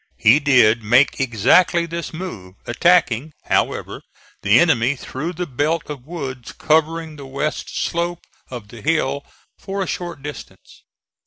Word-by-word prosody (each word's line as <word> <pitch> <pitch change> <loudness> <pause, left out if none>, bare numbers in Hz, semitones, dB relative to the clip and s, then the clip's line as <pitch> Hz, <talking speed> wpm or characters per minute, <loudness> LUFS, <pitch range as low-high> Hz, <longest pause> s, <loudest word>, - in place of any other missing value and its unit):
He 120 +7 +5
did 125 -6 +4
make 120 +6 +3
exactly 135 - +3
this 170 0 -5
move, 110 - -8
attacking, 155 0 +2
however, - - -1 0.4
the - - +5
enemy 120 +5 +3
through 150 +6 -5
the 180 +1 -3
belt 150 +2 -1
of 140 -2 -9
woods 135 -7 -6
covering 160 0 0
the 140 -2 -9
west 140 +3 -3
slope 170 0 -2 0.2
of 120 -5 -8
the 115 0 -11
hill 145 -3 0 0.4
for 195 0 -3
a - - -6
short 170 -5 -5
distance. 150 0 -10
145 Hz, 140 wpm, -20 LUFS, 125-170 Hz, 0.4 s, He